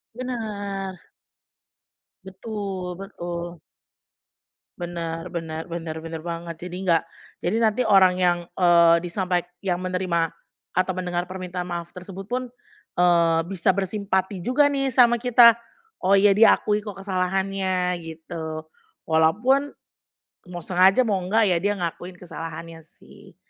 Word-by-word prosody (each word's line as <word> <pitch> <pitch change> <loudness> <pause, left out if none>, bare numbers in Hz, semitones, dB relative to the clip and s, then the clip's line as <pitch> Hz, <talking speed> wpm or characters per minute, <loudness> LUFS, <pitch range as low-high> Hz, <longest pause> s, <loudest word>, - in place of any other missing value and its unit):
Benar. 205 -6 -5 1.2
Betul 190 -2 -5
betul. 175 -3 -6 1.2
Bener 170 -1 -5
bener 165 -1 -5
bener 165 -1 -5
bener 160 -1 -6
banget, 170 0 -5
jadi 180 0 -6
nggak 170 -4 +3 0.4
jadi 185 +5 +1
nanti 220 +2 +2
orang 190 -3 +5
yang, 175 -1 +3 0.2
eee, 170 -2 +6
disampaik 180 0 -1 0.2
yang 180 -3 0
menerima 180 -2 -1 0.4
atau 185 +1 +1
mendengar 180 0 -2
permintaan 180 -1 -5
maaf 170 0 -5
tersebut 190 +1 -9
pun, 250 +2 -3 0.5
eee, 170 -2 +4
bisa 185 -2 -1
bersimpati 190 -1 -1
juga 260 +8 +3
nih 275 -1 0
sama 240 -2 +4
kita, 240 -1 +7 0.5
oh 195 +2 +4
ya 200 0 +5
dia 220 +2 +6
akui 210 0 0
kok 205 -2 -8
kesalahannya 185 -1 -1
gitu, 160 -1 -7 0.4
walaupun 215 - +3 0.8
mau 175 -2 -7
sengaja 190 +6 +4
mau 200 -4 0
enggak 200 +1 +2
ya 170 - +1
dia 205 +1 0
ngakuin 175 +1 -5
kesalahannya 165 -1 -8 0.2
sih, - - -17
185 Hz, 125 wpm, -24 LUFS, 170-200 Hz, 1.2 s, kita